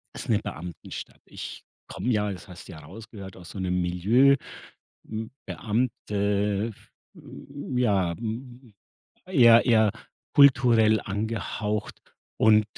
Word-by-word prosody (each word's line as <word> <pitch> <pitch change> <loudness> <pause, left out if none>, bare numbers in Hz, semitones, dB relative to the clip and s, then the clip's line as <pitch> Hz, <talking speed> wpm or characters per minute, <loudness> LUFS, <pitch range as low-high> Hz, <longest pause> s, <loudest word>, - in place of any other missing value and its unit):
ist - - -7
'ne - - +3
Beamtenstadt. 85 +1 -8
Ich - - -9 0.2
komme 125 - -4
ja, 105 -2 +1
das 90 +1 -9
hast 90 -2 -11
du - - -10
ja 80 - -10
rausgehört, 100 +4 -11
aus 90 -1 -12
so 100 - -7
'nem 90 -1 0
Milieu, 110 +11 +4 0.7
hm 110 +1 -5 0.2
Beamte, 105 -2 -1
f - - -23 0.2
hm, 140 -2 -7
ja, 95 -8 +2
hm 120 0 -7 0.5
eher 120 -10 +6
eher 110 -3 +4 0.4
kulturell 120 -6 +5
angehaucht 105 0 -3 0.4
und 110 -1 +5
110 Hz, 120 wpm, -26 LUFS, 100-120 Hz, 0.7 s, eher